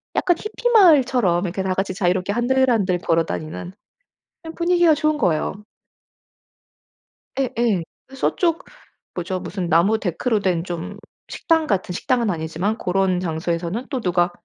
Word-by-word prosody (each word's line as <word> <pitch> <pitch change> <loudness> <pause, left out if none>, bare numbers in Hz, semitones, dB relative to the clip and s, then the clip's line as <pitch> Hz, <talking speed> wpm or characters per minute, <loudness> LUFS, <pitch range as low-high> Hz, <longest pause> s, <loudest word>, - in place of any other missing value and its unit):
약간 350 -2 +2
히피 440 +3 -2
마을처럼 260 - +4
이렇게 185 +2 -3
다 190 -1 0
같이 190 0 -2
자유롭게 185 +1 0
한들 260 +3 +2
한들 190 -6 +1
걸어 165 -1 +1
다니는 160 +4 -6 0.7
그냥 325 -1 -9
분위기가 345 -2 +3
좋은 305 0 0
거예요. 165 - +1 1.9
예예. 235 -8 0 0.3
저쪽 330 +4 0 0.5
뭐죠 185 +1 -3
무슨 180 0 -4
나무 195 +7 +3
데크로 215 +5 -1
된 180 -4 0
좀 180 +3 -6 0.3
식당 325 -2 0
같은 190 -3 -1
식당은 235 +4 0
아니지만 170 +5 -2
고런 185 -2 0
장소에서는 170 +5 -3
또 260 - -2
누가 175 -3 +1
195 Hz, 305 characters per minute, -21 LUFS, 175-260 Hz, 1.9 s, 마을처럼